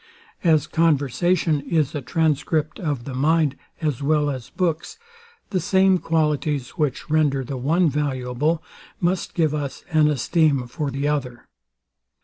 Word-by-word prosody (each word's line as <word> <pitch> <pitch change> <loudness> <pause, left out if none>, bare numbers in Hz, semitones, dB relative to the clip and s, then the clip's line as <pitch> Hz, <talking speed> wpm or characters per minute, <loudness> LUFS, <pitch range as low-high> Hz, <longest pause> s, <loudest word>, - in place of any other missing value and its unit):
As 160 -4 +4
conversation 160 +1 +1
is 155 -1 0
a 145 - -3
transcript 155 +2 0
of 145 -8 -2
the 135 - -6
mind 150 +1 +2 0.3
as 150 -5 -1
well 150 0 +2
as 130 -3 -7
books, 180 - -2 0.5
the 190 - +1
same 190 +1 +3
qualities, 150 -5 0
which 150 -7 -2
render 145 -4 +2
the 135 +2 -5
one 165 +8 +2
valuable, 145 +2 -1 0.4
must 180 +1 -1
give 160 -4 +2
us 145 -3 -4
an 155 -1 +4
esteem 150 -1 +2
for 145 +4 -4
the 140 +2 -2
other. 130 -5 -2
150 Hz, 135 wpm, -23 LUFS, 140-165 Hz, 0.5 s, As